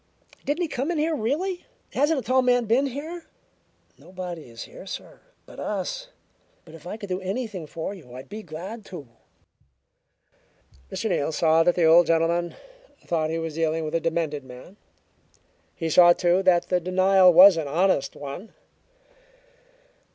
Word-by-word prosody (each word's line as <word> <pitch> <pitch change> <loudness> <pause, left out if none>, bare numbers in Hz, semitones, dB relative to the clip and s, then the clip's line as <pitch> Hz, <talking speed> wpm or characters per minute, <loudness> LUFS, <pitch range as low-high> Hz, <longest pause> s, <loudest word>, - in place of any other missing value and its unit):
"Didn't 300 +5 -1
he - - -1
come 275 +1 -3
in 350 - -1
here, 315 +1 0
really? 320 - -2 0.3
Hasn't 295 +3 +2
a - - -6
tall 255 +4 +2
man 245 -1 +2
been 245 +6 +2
here?" 315 +6 -7 0.7
"Nobody 180 -6 -8
is 115 0 -9
here, 195 - -12
sir, - - -8 0.3
but - - -13
us. - - -4 0.6
But 160 - -15
if 165 +1 -12
I 210 - -5
could 205 -3 -9
do 185 +1 -2
anything 195 -3 -4
for 165 +5 -5
you, 145 -11 -13
I'd 130 +1 -9
be 215 +2 -8
glad 185 +6 -8
to." 170 -9 -9 1.8
Mr. - - -3
Neal 145 - 0
saw 160 +1 +3
that 175 +1 +3
the 175 - +1
old 165 +1 +6
gentleman 170 +1 +1 0.5
thought 160 -2 -1
he 165 - -2
was 165 -1 -4
dealing 160 0 -1
with 155 - -5
a 165 - +2
demented 160 -3 -2
man; 130 +8 -13 1.0
he 165 - -3
saw, 175 +2 +7
too, 175 +1 +2
that 180 -2 +2
the 180 - +2
denial 185 +1 +4
was 185 +2 +9
an 160 -3 -3
honest 170 0 +1
one. 145 +9 -8
180 Hz, 165 wpm, -25 LUFS, 165-225 Hz, 1.8 s, was